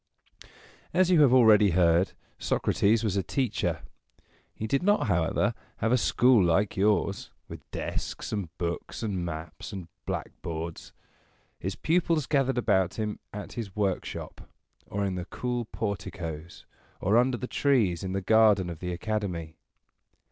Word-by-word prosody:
As 185 0 +4
you 170 -4 +6
have 140 -4 +6
already 110 -5 +6
heard, 85 +1 +3 0.3
Socrates 110 +3 +2
was 105 -3 0
a - - +2
teacher. 90 - -1 0.7
He 110 - -6
did 135 +5 +1
not, 205 +3 +3
however, 85 -6 +1 0.2
have 115 - 0
a - - +5
school 120 -2 +4
like 90 +4 +2
yours, 100 0 +1 0.2
with - - -11
desks, - - -4
and 100 -6 -3
books, 85 +5 -4
and 95 -5 -2
maps, 80 -1 -6
and 95 -5 -7 0.2
blackboards. 80 0 -5 0.7
His 95 +2 -3
pupils 165 -3 +1
gathered 135 -3 +1
about 95 -6 +2
him 105 -1 -3
at 105 0 -7
his 105 -6 -6
workshop, 100 -3 -3 0.5
or 100 0 -2
in 95 - -1
the 90 -1 -4
cool 120 +3 -3
porticoes, 85 -7 -5 0.3
or 100 +4 +2
under 125 +1 +3
the 125 - -4
trees 115 - +1
in 95 -1 -3
the 95 - -1
garden 105 -3 +4
of 80 - -8
the 90 -1 -4
Academy. 90 -4 -3
100 Hz, 145 wpm, -28 LUFS, 90-120 Hz, 0.7 s, you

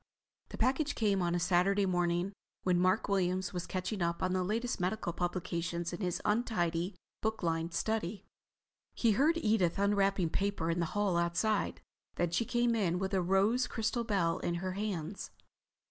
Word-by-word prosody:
The - - -8
package 270 +5 +1
came 200 -4 +2
on 175 0 +1
a - - +1
Saturday 185 +3 +3
morning, 175 +1 0 0.3
when 180 -1 +2
Mark 185 +4 +2
Williams 185 -2 0
was 180 -1 -4
catching 185 +2 -3
up 170 0 0
on 185 0 +1
the 185 -1 +1
latest 230 +6 -1
medical 180 -1 -1
publications 175 -1 -2
in 175 - -5
his 180 -2 -1
untidy, 185 -5 0 0.3
book 220 -2 -2
lined 165 0 -1
study. 215 -3 -2 0.7
He 230 - +3
heard 295 +10 +3
Edith 210 - +2
unwrapping 195 -3 +2
paper 195 -4 0
in 170 - -1
the 170 - +1
hall 200 -4 +2
outside. 170 +5 0 0.3
Then 175 -1 0
she 230 +7 +1
came 240 +1 +2
in 185 -6 +1
with 190 +1 -2
the 190 -2 +2
rose 195 +8 +2
crystal 225 +1 -1
bell 185 -6 +1
in 170 - -1
her 185 +2 -3
hands. 195 -2 -4
185 Hz, 170 wpm, -32 LUFS, 175-215 Hz, 0.7 s, Saturday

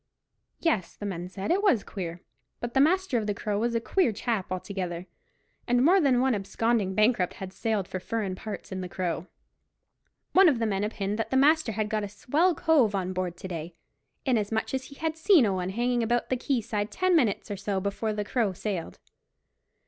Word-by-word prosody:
Yes, 225 - 0
the 205 - -7
men 180 -3 -4
said, 195 - -3
it 380 +3 +3
was 295 - +3
queer; 175 -3 -6 0.4
but 240 0 -4
the 270 - +3
master 340 -4 +3
of 215 - -4
the 205 - -1
Crow 205 0 -2
was 235 +1 0
a - - +3
queer 345 +5 +2
chap 220 -2 -2
altogether, 185 -2 -4 0.6
and 245 +1 +3
more 370 +4 +6
than 265 -5 +3
one 260 0 +3
absconding 205 0 0
bankrupt 215 -4 +2
had 190 -1 -7
sailed 215 -4 -1
for 185 - -4
furrin 205 -1 -2
parts 200 +2 -7
in 185 0 -3
the 180 - -5
Crow. 175 -1 -3 1.1
One 380 -2 +7
of 275 - +1
the 230 - 0
men 200 -2 0
opined 210 0 -2
that 225 - -1
the 265 - +1
master 295 -3 +4
had 215 0 -1
got 215 0 -1
a 205 - -4
swell 310 - +1
cove 265 -11 +3
on 185 -1 -2
board 180 -2 -3
to 190 - -7
day, 165 -1 -6 0.5
inasmuch 220 -3 0
as 260 -1 -2
he 280 - -12
had 315 +1 -2
seen 325 -2 +5
such 215 - +3
a - - 0
one 185 -1 -2
hanging 240 +4 0
about 240 +1 0
the 255 - +2
quay 255 0 0
side 210 -2 -2
ten 370 +4 +2
minutes 225 -8 +1
or - - -1
so 200 0 -1
before 200 +3 -2
the 210 -1 -3
Crow 220 -4 0
sailed. 185 -2 -4
215 Hz, 210 wpm, -27 LUFS, 190-255 Hz, 1.1 s, One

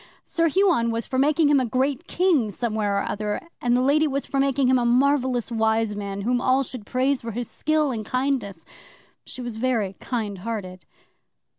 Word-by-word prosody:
Sir 330 -1 0
Huon 340 -9 +2
was 230 0 -2
for 260 - -2
making 300 +2 +3
him 290 -2 +5
a - - +1
great 260 +3 -1
King 335 - +2
somewhere 210 -2 -1
or 200 - 0
other, 210 0 -2 0.2
and 245 0 +2
the 250 - +1
Lady 300 +3 +3
was 275 -1 -2
for 275 - -2
making 275 0 +2
him 255 0 +4
a - - 0
marvellous 250 -1 +2
wise 220 -1 +1
man 200 -1 -5
whom 245 +4 0
all 260 +1 +3
should 245 -4 -9
praise 260 +1 +1
for 230 - -6
his 240 +1 -3
skill 305 -2 0
and 220 -3 -3
kindness. 255 -7 -2 0.6
She 255 - -8
was 240 -2 -5
very 225 -5 0
kind 215 -6 -3
hearted. 185 -4 -6
245 Hz, 190 wpm, -24 LUFS, 220-275 Hz, 0.6 s, him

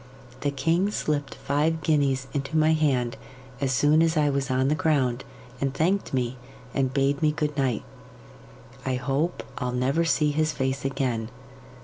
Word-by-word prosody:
The 145 - 0
king 165 +8 +1
slipped 145 -8 -2
five 155 +3 0
guineas 140 -4 +2
into 140 +2 -2
my 155 +1 +4
hand 130 -6 +1 0.4
as 135 -2 0
soon 145 +5 +4
as 165 0 +2
I 150 -1 +3
was 140 0 -1
on 130 +1 +2
the 145 - +3
ground, 135 -6 +1 0.4
and 135 -1 -1
thanked 185 +7 +1
me, 125 -1 -1 0.4
and 135 -2 +1
bade 140 +1 +1
me 155 -1 +4
good 150 -1 -2
night. 130 -5 0 1.0
I 130 -1 -1
hope 135 +7 -1 0.2
I'll 125 -2 -2
never 135 +6 +1
see 155 -2 +2
his 155 +1 +1
face 130 0 -2
again. 130 -5 -1
140 Hz, 160 wpm, -26 LUFS, 130-155 Hz, 1.0 s, my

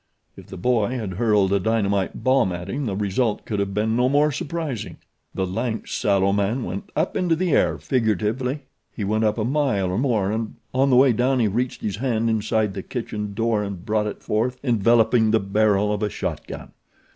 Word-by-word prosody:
If - - -13
the - - -9
boy 120 +4 +1
had 105 -6 -4
hurled 105 -2 +2
a 100 - +3
dynamite 100 -2 0
bomb 130 -7 +3
at 90 0 -5
him 140 -1 -2
the 100 - -2
result 105 +3 -1
could 105 -3 -2
have 100 -1 -1
been 110 +1 +1
no 125 +1 +3
more 145 +2 +3
surprising. 150 - -4 0.4
The 95 - 0
lank, 110 +4 -3
sallow 100 -1 +1
man 105 +5 0
went 100 -1 -6
up 160 +4 0
into 175 -3 +2
the 180 +1 -1
air, - - +2
figuratively. 125 - -1 0.3
He 105 - -5
went 110 +2 +1
up 105 +1 +1
a 110 - 0
mile 125 -9 0
or 95 - -1
more, 110 -7 +1
and 110 0 -3 0.2
on 135 +2 +3
the 130 - +4
way 130 0 +6
down 125 +3 +1
he 115 - +3
reached 120 +5 -2
his 100 -2 -2
hand 115 -2 0
inside 110 -1 0
the 95 - -5
kitchen 105 -3 -5
door 115 -1 +1
and 100 -4 -6
brought 105 -1 0
it 105 - -7
forth 120 +4 -1
enveloping 115 -1 +3
the 110 +1 +3
barrel 105 +1 +2
of 105 - -3
a 105 - 0
shot - - -4
gun. - - -8
110 Hz, 205 wpm, -23 LUFS, 100-125 Hz, 0.4 s, way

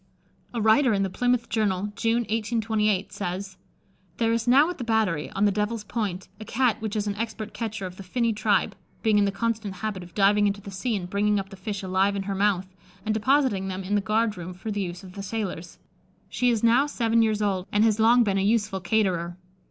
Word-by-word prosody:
A 235 - -3
writer 220 +3 +4
in 195 -1 +1
the 190 - -2
Plymouth 245 +2 +1
Journal, 205 -2 -1
June 230 +1 +1
1828, 220 -3 0
says: 190 0 -5 0.6
"There 230 -1 +2
is 230 +1 -1
now 275 +5 +6
at 360 - -9
the - - -3
battery, 220 -9 0
on 200 - +2
the 205 - +4
Devil's 210 +2 -2
Point, 200 -4 -3
a - - -6
Cat 235 +1 0
which 220 -1 -3
is 210 -1 0
an 205 - -1
expert 220 -1 -4
catcher 220 -3 -4
of 180 0 -8
the - - -8
finny 230 +5 0
tribe, 210 -3 +1 0.3
being 215 -2 +4
in 205 - +4
the 200 - +1
constant 215 -1 -2
habit 200 0 -4
of 175 -1 -13
diving 205 +1 +4
into 200 0 -1
the 200 0 -9
sea 220 +5 -2
and 180 -3 -4
bringing 205 +2 +1
up 195 0 -6
the 195 - -10
fish 195 +1 -5
alive 190 +2 +1
in 195 - -2
her 200 0 -3
mouth, 195 -1 +1 0.4
and 215 - +1
depositing 220 -3 +2
them 190 0 -4
in 190 +2 -3
the 205 - +3
guard 215 0 0
room 180 +1 -7
for 215 +4 -5
the 205 0 -2
use 175 0 -5
of 185 -1 -11
the 200 - -6
sailors. 195 -4 -5 0.5
She 250 - +1
is 230 -2 0
now 240 +5 +4
seven 230 -5 +1
years 215 -1 +1
old, 190 -3 -1
and 205 +1 +3
has 220 -1 +3
long 235 +2 +6
been 195 -3 +1
a - - +1
useful 210 -2 +1
caterer. 175 -3 0
210 Hz, 230 wpm, -25 LUFS, 195-225 Hz, 0.6 s, now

